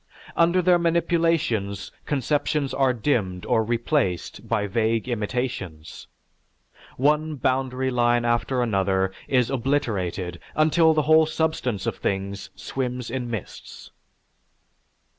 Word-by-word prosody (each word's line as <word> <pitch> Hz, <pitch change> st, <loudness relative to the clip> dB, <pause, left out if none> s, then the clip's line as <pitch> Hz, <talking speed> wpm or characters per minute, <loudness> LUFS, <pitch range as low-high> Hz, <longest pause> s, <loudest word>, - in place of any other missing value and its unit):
Under 170 Hz, +2 st, +3 dB
their 175 Hz, 0 st, +5 dB
manipulations 165 Hz, -, 0 dB, 0.2 s
conceptions 145 Hz, 0 st, 0 dB
are 135 Hz, -2 st, +3 dB
dimmed 105 Hz, -8 st, -1 dB
or 110 Hz, -, +2 dB
replaced 115 Hz, -, -1 dB
by 110 Hz, -3 st, +1 dB
vague 110 Hz, +3 st, 0 dB
intimations. 105 Hz, -8 st, -4 dB, 0.9 s
One 150 Hz, +3 st, +2 dB
boundary 130 Hz, 0 st, 0 dB
line 120 Hz, -1 st, +2 dB
after 120 Hz, +2 st, +1 dB
another 95 Hz, -3 st, +1 dB, 0.2 s
is 125 Hz, -3 st, +2 dB
obliterated 105 Hz, -10 st, -1 dB, 0.2 s
until 160 Hz, +1 st, +4 dB
the 155 Hz, -, +2 dB
whole 155 Hz, +1 st, +5 dB
substance 155 Hz, -10 st, -1 dB
of -, -, -2 dB
things 100 Hz, +1 st, -3 dB
swims 125 Hz, +4 st, -4 dB
in 125 Hz, -2 st, -3 dB
mists." 115 Hz, -5 st, -8 dB
125 Hz, 105 wpm, -24 LUFS, 105-150 Hz, 0.9 s, their